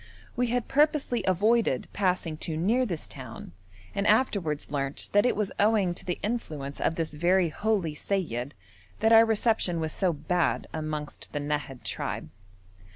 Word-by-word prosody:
We 245 0 +1
had 245 0 -1
purposely 290 -4 +2
avoided 205 - +2
passing 180 -5 0
too 155 0 -3
near 230 +10 +2
this 170 -6 -4
town, 130 -8 -9 0.4
and 200 +1 0
afterwards 200 - +1
learnt 140 -1 -3
that 205 +4 +5
it - - +1
was 210 -2 -1
owing 205 -4 +3
to - - -9
the 180 - -2
influence 155 - -3
of 165 - +1
this 160 -2 -2
very 175 +3 +3
holy 195 -3 0
seyyid 145 - -2 0.5
that 220 +1 +4
our 225 0 +9
reception 220 -6 +2
was 160 -1 -1
so 185 -3 +1
bad 165 +3 0
amongst 155 -1 -5
the 145 - -1
Nahad 145 -3 -3
tribe. 75 - -4
180 Hz, 155 wpm, -28 LUFS, 150-220 Hz, 0.5 s, our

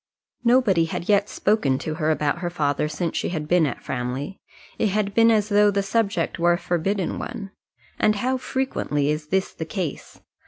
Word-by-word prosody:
Nobody 235 -9 +4
had 170 +3 -5
yet 205 0 +3
spoken 150 -11 +1
to 155 - -4
her 155 - +2
about 150 +1 0
her 175 0 -2
father 150 -3 0
since 165 +2 -3
she - - -1
had 155 -3 -3
been 175 -2 +3
at 130 - -6
Framley. 130 +8 -4 0.4
It 220 - +3
had 200 0 -1
been 230 +1 +5
as 215 -2 +2
though 205 0 +5
the 200 -1 0
subject 200 -2 0
were 175 +1 +4
a - - 0
forbidden 180 +2 -1
one. 195 -1 -6 0.5
And 215 - +3
how 255 +5 0
frequently 255 - -1
is 150 0 -3
this 190 +4 0
the - - -5
case! 165 -2 -5
180 Hz, 190 wpm, -23 LUFS, 155-210 Hz, 0.5 s, been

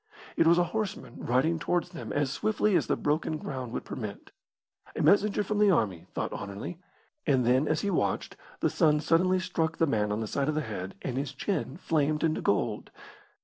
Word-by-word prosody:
It 165 - +4
was 170 +1 +6
a 175 - +5
horseman 215 - -3
riding 150 +7 +2
towards 175 +2 0
them 170 -3 -7
as 145 -2 0
swiftly 210 +3 +1
as 170 - +2
the - - +2
broken 155 +1 0
ground 130 -5 -5
would - - -4
permit. 105 -6 -7 0.6
A - - -1
messenger 205 +1 +4
from 210 +1 -1
the 210 -1 +5
army, 100 - +1
thought - - -2
Anerley; 100 - -6 0.5
and 130 -4 +3
then, 130 +5 +3
as 155 - +1
he 200 - 0
watched, - - -1 0.3
the - - +3
sun 150 -4 +3
suddenly 180 +4 +3
struck 165 -3 -1
the 165 - +3
man 105 -7 0
on 105 - -1
the 110 - -2
side 140 +6 -1
of 155 - 0
the 155 - +1
head, 100 -7 -5
and 130 -1 -3
his 140 0 -2
chin 160 -3 -2
flamed 155 -3 0
into 160 -1 +1
gold. - - 0
155 Hz, 200 wpm, -29 LUFS, 130-175 Hz, 0.6 s, was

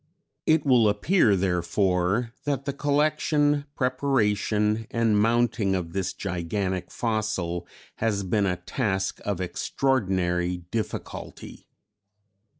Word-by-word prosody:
] - - -54
"It 155 -2 +3
will 120 -5 +5
appear, 105 - +3
therefore, 95 +4 +1
that 140 -2 -1
the 140 - -2
collection, 145 0 +1
preparation 110 -5 +1
and 115 -2 +2
mounting 115 -3 +2
of 85 -3 -4
this 95 -2 -1
gigantic 90 0 -3
fossil 105 -7 -2 0.3
has 105 -3 0
been 100 +2 +1
a 90 -1 0
task 95 +1 -2
of 100 -3 -2
extraordinary 90 -4 0
difficulty. 90 +5 -6
105 Hz, 105 wpm, -26 LUFS, 95-125 Hz, 0.3 s, will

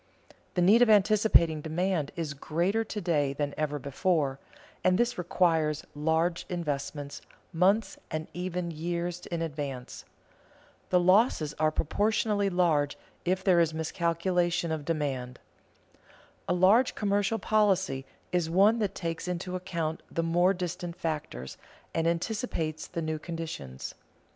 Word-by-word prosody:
The 180 - +3
need 210 +6 +6
of 245 - +6
anticipating 205 -6 +4
demand 165 -1 -1
is 160 -4 -3
greater 175 +10 0
to 215 -1 -5
day 150 -6 +1
than 145 0 -2
ever 150 -1 -1
before, 140 -1 0 0.4
and 185 0 +4
this 240 +2 +1
requires 165 -4 +1
large 160 +3 +1
investments 145 -4 -4 0.3
months 195 +6 +2
and 155 0 -4
even 180 -1 -3
years 170 +2 -3
in 170 -1 -2
advance. 140 -5 -5 0.9
The 180 - +4
losses 185 - +3
are 155 0 +4
proportionally 205 +5 +1
large 160 -6 +2 0.3
if 185 +1 0
there 185 -3 +5
is 160 -2 +2
miscalculation 170 +1 0
of 155 -2 -3
demand. 135 -6 -2 1.1
A - - +3
large 200 +8 +4
commercial 205 +1 +1
policy 190 -10 +2 0.3
is 175 -2 +1
one 200 +7 +4
that 205 -3 -1
takes 165 -1 -4
into 180 +1 -3
account 170 -3 -3
the 165 - -1
more 175 +3 +3
distant 175 -1 -4
factors, 150 - -4 0.3
and 165 0 +1
anticipates 170 -3 -2
the 170 -2 -4
new 155 0 -2
conditions. 155 - -6
170 Hz, 130 wpm, -29 LUFS, 155-185 Hz, 1.1 s, need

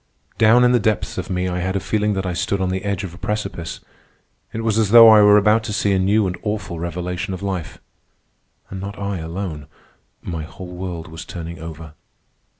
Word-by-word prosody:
Down 115 +3 +6
in 125 - +5
the 125 - +4
depths 110 -2 -1
of 95 - -6
me 90 -1 -1
I 90 0 -2
had 95 +2 -2
a - - +1
feeling 105 +2 0
that 95 -1 -2
I 90 - -2
stood 100 +3 -1
on 95 -1 0
the 95 +1 -2
edge 100 -1 -2
of 90 -3 -6
a 90 - -13
precipice. 105 -6 -4 0.7
It 115 - -4
was 110 -1 +1
as 110 -3 +2
though 115 +1 +10
I 110 -1 +8
were 105 0 +7
about 105 +2 +3
to 105 - -3
see 100 0 +1
a 95 - +2
new 100 +3 +2
and 90 -1 -2
awful 105 -5 -4
revelation 90 +2 -4
of 95 - -9
life. 95 -6 -4 0.9
And 95 -1 -6
not 100 +1 -6
I 100 -2 -3
alone. 80 -2 -5 0.6
My 85 -3 -4
whole 90 +3 -9
world 90 -2 -5
was 80 0 -8
turning 85 -1 -7
over. 80 -1 -9
95 Hz, 215 wpm, -21 LUFS, 85-105 Hz, 0.9 s, though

